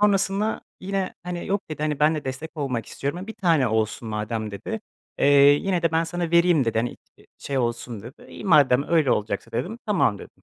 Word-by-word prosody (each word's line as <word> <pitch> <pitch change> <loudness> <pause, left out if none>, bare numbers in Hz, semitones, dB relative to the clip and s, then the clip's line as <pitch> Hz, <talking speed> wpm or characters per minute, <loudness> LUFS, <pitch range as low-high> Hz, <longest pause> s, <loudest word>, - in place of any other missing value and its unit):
sonrasında 205 +1 +2 0.2
yine, 195 0 -2
hani, 175 -1 -5
"Yok" 200 -2 -2
dedi, 150 - -4
"hani 150 -2 -1
ben 155 +2 +4
de 150 - -4
destek 155 +5 -6
olmak 130 -6 -2
istiyorum, 145 +6 -4
e, 190 - -7
1 220 - -7
tane 160 - +2
olsun 110 +1 -1
madem." 110 0 -3
dedi, 205 - -5 0.4
eee, - - +3 0.3
"Yine 180 +4 0
de 165 -1 +1
ben 165 +1 +2
sana 170 0 -3
vereyim" 170 -5 +4
dedi, 115 -1 0
"hani, 120 +2 -2 0.2
t - - -21
şey 140 -1 -3
olsun." 120 -3 -3
dedi. 125 +6 -12
"İyi - - -10
madem 145 -8 +5
öyle 160 -6 +3
olacaksa." 105 -1 -1
dedim, 220 +6 -3
"Tamam." 175 - +2
dedim. - - -14
155 Hz, 205 wpm, -24 LUFS, 120-180 Hz, 0.4 s, madem